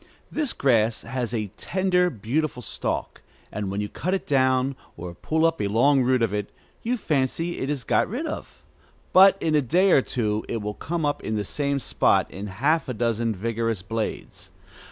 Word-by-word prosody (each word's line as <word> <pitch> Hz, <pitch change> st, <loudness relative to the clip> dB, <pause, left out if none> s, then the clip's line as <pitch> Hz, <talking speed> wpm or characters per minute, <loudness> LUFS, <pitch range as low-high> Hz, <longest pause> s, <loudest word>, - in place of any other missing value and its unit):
This 300 Hz, -5 st, 0 dB
grass 115 Hz, -4 st, +2 dB
has 125 Hz, -1 st, -3 dB
a 105 Hz, -5 st, -3 dB
slender, 180 Hz, -1 st, +1 dB
beautiful 125 Hz, -, -2 dB
stalk: -, -, -3 dB, 0.3 s
and 105 Hz, -2 st, -3 dB
when 100 Hz, +2 st, -2 dB
you 105 Hz, -, -2 dB
cut 185 Hz, -, -2 dB
it 190 Hz, -, -4 dB
down, 130 Hz, -1 st, +2 dB, 0.2 s
or 85 Hz, +1 st, -6 dB
pull 160 Hz, -, 0 dB
up 165 Hz, 0 st, +1 dB
a 100 Hz, -, +1 dB
long 130 Hz, +7 st, +4 dB
root 130 Hz, -1 st, +2 dB
of 110 Hz, -3 st, 0 dB
it, 105 Hz, -1 st, -3 dB, 0.3 s
you 245 Hz, +2 st, -1 dB
fancy 160 Hz, -, -1 dB
it 135 Hz, -, -2 dB
is 145 Hz, -4 st, -2 dB
got -, -, +2 dB
rid 255 Hz, -, -3 dB
of; 310 Hz, -, -7 dB, 0.5 s
but 195 Hz, +1 st, +8 dB
in 160 Hz, -, 0 dB
a 150 Hz, -, +4 dB
day 180 Hz, +9 st, +3 dB
or 135 Hz, -, +6 dB
two 110 Hz, -4 st, -1 dB
it 115 Hz, -, -1 dB
will 105 Hz, 0 st, -4 dB
come 165 Hz, +7 st, -3 dB
up 145 Hz, -, -1 dB
in 110 Hz, -, -2 dB
the 105 Hz, -1 st, -1 dB
same 140 Hz, +5 st, -1 dB
spot 135 Hz, -, +2 dB
in 100 Hz, +4 st, -6 dB
half 140 Hz, -, 0 dB
a 125 Hz, -, -3 dB
dozen 115 Hz, -1 st, 0 dB
vigorous 115 Hz, 0 st, -2 dB
blades. 110 Hz, +2 st, -4 dB
130 Hz, 195 wpm, -25 LUFS, 110-160 Hz, 0.5 s, but